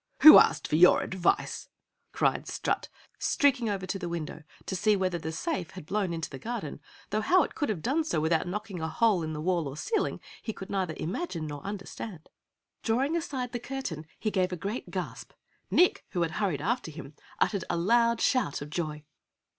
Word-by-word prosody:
"Who 310 Hz, -, +13 dB
asked -, -, +3 dB
for 155 Hz, -, +1 dB
your 180 Hz, +2 st, +7 dB
advice?" 185 Hz, -2 st, 0 dB, 0.4 s
cried -, -, +1 dB
Strut, -, -, -2 dB, 0.3 s
streaking 260 Hz, -5 st, +2 dB
over 195 Hz, -2 st, -2 dB
to 195 Hz, +1 st, -3 dB
the 175 Hz, -2 st, -4 dB
window 165 Hz, -2 st, -5 dB, 0.2 s
to 190 Hz, -, -3 dB
see 210 Hz, +3 st, +3 dB
whether 185 Hz, -3 st, 0 dB
the 160 Hz, 0 st, -4 dB
safe 180 Hz, -, -3 dB
had 185 Hz, -5 st, -10 dB
blown 195 Hz, 0 st, -1 dB
into 165 Hz, -1 st, -3 dB
the 135 Hz, -, -7 dB
garden, 235 Hz, -, -5 dB, 0.3 s
though 215 Hz, +1 st, +1 dB
how 360 Hz, +11 st, +5 dB
it -, -, -5 dB
could 290 Hz, -, -1 dB
have 185 Hz, -7 st, -2 dB
done 290 Hz, +6 st, +1 dB
so 240 Hz, -, 0 dB
without 160 Hz, +2 st, +1 dB
knocking 200 Hz, -1 st, -4 dB
a 160 Hz, -, -1 dB
hole 200 Hz, +2 st, +3 dB
in 160 Hz, -1 st, -3 dB
the 150 Hz, -, -4 dB
wall 170 Hz, -2 st, +1 dB
or 135 Hz, +2 st, -7 dB
ceiling, 440 Hz, -, -1 dB, 0.2 s
he 220 Hz, -, -4 dB
could 190 Hz, -, -9 dB
neither 185 Hz, -5 st, -1 dB
imagine 175 Hz, -, -3 dB
nor 145 Hz, -2 st, -6 dB
understand. 195 Hz, -2 st, -7 dB, 0.5 s
Drawing 265 Hz, +8 st, +1 dB
aside 265 Hz, -7 st, -3 dB
the 240 Hz, -, -3 dB
curtain 230 Hz, -, -5 dB
he 215 Hz, -, -1 dB
gave 185 Hz, -2 st, +1 dB
a 180 Hz, -, -3 dB
great 200 Hz, +8 st, -4 dB
gasp. -, -, -5 dB, 0.4 s
Nick, 360 Hz, -, +4 dB
who 175 Hz, -3 st, +1 dB
had 165 Hz, -, -1 dB
hurried 180 Hz, -6 st, -1 dB
after 230 Hz, +1 st, -1 dB
him, 155 Hz, -2 st, -9 dB, 0.3 s
uttered 200 Hz, -4 st, +1 dB
a 175 Hz, -, 0 dB
loud 230 Hz, +6 st, +3 dB
shout 245 Hz, -, +1 dB
of 145 Hz, -, -11 dB
joy. 155 Hz, -3 st, -3 dB
190 Hz, 200 wpm, -29 LUFS, 165-230 Hz, 0.5 s, Who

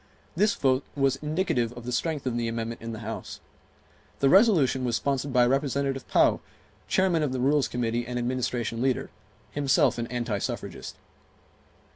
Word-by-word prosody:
This 210 Hz, +6 st, +2 dB
vote 130 Hz, -, +2 dB
was 135 Hz, -1 st, +2 dB
indicative 150 Hz, -6 st, -1 dB
of 120 Hz, -1 st, -10 dB
the 125 Hz, -, -3 dB
strength 150 Hz, +3 st, -1 dB
of 125 Hz, -2 st, -1 dB
the 120 Hz, -1 st, -1 dB
amendment 115 Hz, 0 st, -4 dB
in 115 Hz, 0 st, -5 dB
the 110 Hz, 0 st, -7 dB
House. 115 Hz, -, -6 dB, 0.8 s
The 135 Hz, -, +4 dB
resolution 175 Hz, -, +4 dB
was 120 Hz, -2 st, 0 dB
sponsored 140 Hz, +2 st, -1 dB
by 125 Hz, -1 st, +4 dB
Representative 135 Hz, 0 st, 0 dB
Pou, -, -, +3 dB, 0.5 s
Chairman 185 Hz, -4 st, +2 dB
of 145 Hz, -4 st, -1 dB
the 130 Hz, -, -2 dB
Rules 135 Hz, 0 st, +2 dB
Committee 120 Hz, 0 st, -2 dB
and 125 Hz, 0 st, -3 dB
Administration 120 Hz, -2 st, -2 dB
leader, 130 Hz, -1 st, 0 dB, 0.4 s
himself 140 Hz, -4 st, +2 dB
an 115 Hz, -, -2 dB
anti 120 Hz, -4 st, -2 dB
suffragist. -, -, -5 dB
130 Hz, 160 wpm, -27 LUFS, 120-140 Hz, 0.8 s, The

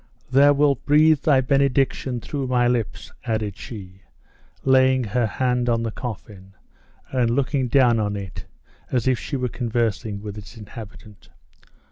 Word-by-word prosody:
Thou 140 Hz, +2 st, +6 dB
wilt 140 Hz, -3 st, +2 dB
breathe 155 Hz, +1 st, +5 dB
thy 140 Hz, -3 st, +3 dB
benediction 135 Hz, -2 st, +1 dB
through 140 Hz, +1 st, -4 dB
my 125 Hz, -1 st, +2 dB
lips," 120 Hz, -4 st, -2 dB
added 110 Hz, -4 st, -2 dB
she, 95 Hz, -6 st, -10 dB, 0.6 s
laying 130 Hz, -1 st, +4 dB
her 115 Hz, +2 st, 0 dB
hand 125 Hz, +1 st, 0 dB
on 115 Hz, -1 st, +1 dB
the 115 Hz, -, -2 dB
coffin, 100 Hz, -5 st, -8 dB, 0.6 s
and 125 Hz, -3 st, +1 dB
looking 130 Hz, +1 st, 0 dB
down 120 Hz, -2 st, +4 dB
on 105 Hz, -1 st, -1 dB
it 100 Hz, -3 st, -7 dB, 0.4 s
as 125 Hz, -1 st, 0 dB
if 130 Hz, -2 st, +2 dB
she 145 Hz, -, -5 dB
were 125 Hz, -1 st, -1 dB
conversing 115 Hz, -3 st, -2 dB
with 105 Hz, 0 st, -6 dB
its 105 Hz, +4 st, -13 dB
inhabitant. 105 Hz, -2 st, -12 dB
120 Hz, 145 wpm, -23 LUFS, 110-130 Hz, 0.6 s, Thou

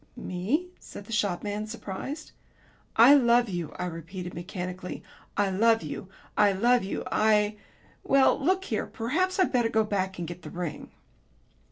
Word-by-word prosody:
'" -, -, -36 dB
"Me?" 230 Hz, -, -2 dB
said 205 Hz, -, -10 dB
the 230 Hz, -, -11 dB
shopman, 205 Hz, 0 st, -1 dB
surprised. 230 Hz, +7 st, -6 dB, 0.6 s
"I 235 Hz, +5 st, +8 dB
love 240 Hz, -4 st, +5 dB
you," 175 Hz, -4 st, -4 dB
I -, -, -2 dB
repeated 175 Hz, +2 st, -6 dB
mechanically. 180 Hz, +1 st, -6 dB, 0.3 s
"I 200 Hz, -1 st, +2 dB
love 225 Hz, +4 st, +3 dB
you. 190 Hz, -, -6 dB, 0.3 s
I 205 Hz, -1 st, +4 dB
love 240 Hz, +4 st, +3 dB
you, 195 Hz, -, -3 dB
I 210 Hz, -1 st, +3 dB, 0.5 s
Well, 270 Hz, -1 st, +4 dB
look 375 Hz, +4 st, +2 dB
here, -, -, -2 dB
perhaps 320 Hz, +11 st, -1 dB
I'd 375 Hz, -, +3 dB
better 240 Hz, -2 st, +3 dB
go 220 Hz, -1 st, +2 dB
back 190 Hz, -3 st, -2 dB
and 175 Hz, -1 st, -4 dB
get 175 Hz, +1 st, -8 dB
the 155 Hz, -, -8 dB
ring." 175 Hz, -2 st, -5 dB
210 Hz, 160 wpm, -27 LUFS, 180-235 Hz, 0.6 s, I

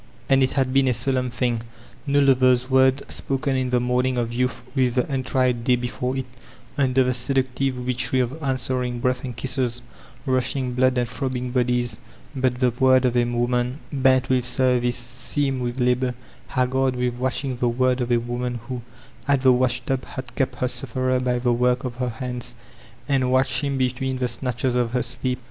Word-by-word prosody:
And 135 Hz, -1 st, +5 dB
it 130 Hz, -, +2 dB
had 130 Hz, -2 st, 0 dB
been 135 Hz, -1 st, +4 dB
a 125 Hz, -, +2 dB
solemn 130 Hz, +1 st, 0 dB
thing! 120 Hz, -1 st, -1 dB, 0.5 s
No 140 Hz, 0 st, +3 dB
fever's 130 Hz, -1 st, +3 dB
word 130 Hz, +1 st, +4 dB
spoken 135 Hz, 0 st, -1 dB
in 130 Hz, -1 st, 0 dB
the 125 Hz, 0 st, +2 dB
morning 125 Hz, +1 st, 0 dB
of 120 Hz, -1 st, -1 dB
youth 125 Hz, 0 st, -1 dB
with 130 Hz, -3 st, +1 dB
the 125 Hz, -, +2 dB
untried 130 Hz, -3 st, 0 dB
day 125 Hz, 0 st, +4 dB
before 125 Hz, +1 st, -3 dB
it, 130 Hz, -, -2 dB, 0.5 s
under 130 Hz, -2 st, +3 dB
the 125 Hz, 0 st, +1 dB
seductive 130 Hz, +1 st, 0 dB
witchery 125 Hz, +1 st, +1 dB
of 125 Hz, -1 st, +1 dB
an 135 Hz, -2 st, +1 dB
s 125 Hz, -2 st, -4 dB
we 130 Hz, -, +1 dB
ring 125 Hz, -1 st, -2 dB
breath 125 Hz, +1 st, 0 dB
and 125 Hz, -3 st, -6 dB
kisses, 125 Hz, -1 st, -1 dB, 0.4 s
rushing 130 Hz, 0 st, 0 dB
blood 130 Hz, 0 st, +2 dB
and 120 Hz, -1 st, +1 dB
throbbing 125 Hz, 0 st, -3 dB
Ixxfiest 125 Hz, -2 st, 0 dB, 0.4 s
but 130 Hz, -2 st, 0 dB
the 125 Hz, -2 st, +3 dB
word 130 Hz, +1 st, +4 dB
of 125 Hz, -1 st, +1 dB
a 120 Hz, -, +4 dB
woman 120 Hz, +2 st, 0 dB, 0.2 s
bent 130 Hz, -2 st, +3 dB
with 130 Hz, -1 st, +2 dB
service, 125 Hz, -1 st, +2 dB
seamed 130 Hz, +2 st, -2 dB
witti 125 Hz, +1 st, -1 dB
labor, 125 Hz, 0 st, +1 dB, 0.3 s
haggard 130 Hz, +1 st, +1 dB
with 125 Hz, -1 st, -1 dB
watching; 130 Hz, 0 st, -1 dB
the 120 Hz, 0 st, +1 dB
word 130 Hz, +1 st, +1 dB
of 120 Hz, 0 st, -2 dB
a 120 Hz, -, +4 dB
woman 120 Hz, +1 st, -3 dB
who, 125 Hz, -2 st, -4 dB, 0.5 s
at 140 Hz, -2 st, +3 dB
the 130 Hz, -1 st, +6 dB
washtub, 125 Hz, +1 st, 0 dB
had 130 Hz, -2 st, -8 dB
kept 130 Hz, -2 st, -1 dB
her 125 Hz, -, -1 dB
sufferer 130 Hz, +1 st, -1 dB
by 125 Hz, -1 st, 0 dB
the 120 Hz, 0 st, +1 dB
work 125 Hz, +1 st, +1 dB
of 125 Hz, -2 st, -5 dB
her 125 Hz, -1 st, -1 dB
hands, 120 Hz, +1 st, -5 dB, 0.5 s
and 130 Hz, -3 st, +1 dB
watched 130 Hz, +3 st, +2 dB
him 140 Hz, -2 st, -1 dB
between 130 Hz, +1 st, -1 dB
the 125 Hz, -, -1 dB
snatdies 125 Hz, +1 st, -1 dB
of 120 Hz, -1 st, 0 dB
her 125 Hz, -, +1 dB
sleep. 125 Hz, -1 st, -2 dB
125 Hz, 195 wpm, -23 LUFS, 125-130 Hz, 0.5 s, the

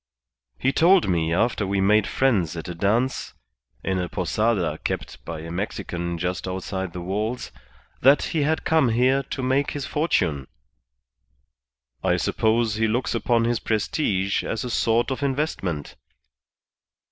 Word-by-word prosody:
He 135 Hz, -, +1 dB
told 175 Hz, +5 st, +5 dB
me 85 Hz, -3 st, +1 dB
after 105 Hz, +3 st, +1 dB
we 100 Hz, 0 st, 0 dB
made 105 Hz, +1 st, +4 dB
friends 100 Hz, -, +1 dB
at 80 Hz, -, -6 dB
a 90 Hz, -, -4 dB
dance, 110 Hz, +9 st, 0 dB, 0.5 s
in 95 Hz, -1 st, 0 dB
a 90 Hz, -1 st, -2 dB
Posada 100 Hz, -9 st, 0 dB
kept -, -, -4 dB
by 80 Hz, -2 st, -5 dB
a 85 Hz, +1 st, -7 dB
Mexican 85 Hz, -2 st, -3 dB
just 90 Hz, +2 st, -3 dB
outside 95 Hz, 0 st, -4 dB
the 90 Hz, -, -5 dB
walls, 105 Hz, +7 st, -3 dB, 0.5 s
that 135 Hz, +3 st, +6 dB
he 160 Hz, -, +1 dB
had 155 Hz, +2 st, +1 dB
come 160 Hz, -6 st, +3 dB
here 130 Hz, +4 st, +3 dB
to 135 Hz, 0 st, -5 dB
make 135 Hz, +2 st, +1 dB
his 145 Hz, -2 st, -4 dB
fortune. 90 Hz, -, 0 dB, 1.6 s
I -, -, +2 dB
suppose 110 Hz, -1 st, +1 dB
he 110 Hz, 0 st, +2 dB
looks 120 Hz, +4 st, 0 dB
upon 115 Hz, 0 st, +2 dB
his 120 Hz, -1 st, +1 dB
prestige 100 Hz, -3 st, 0 dB
as 115 Hz, -, -3 dB
a 125 Hz, -, -4 dB
sort 115 Hz, +2 st, +2 dB
of 130 Hz, -, -3 dB
investment." 130 Hz, -, -2 dB
110 Hz, 145 wpm, -24 LUFS, 90-130 Hz, 1.6 s, that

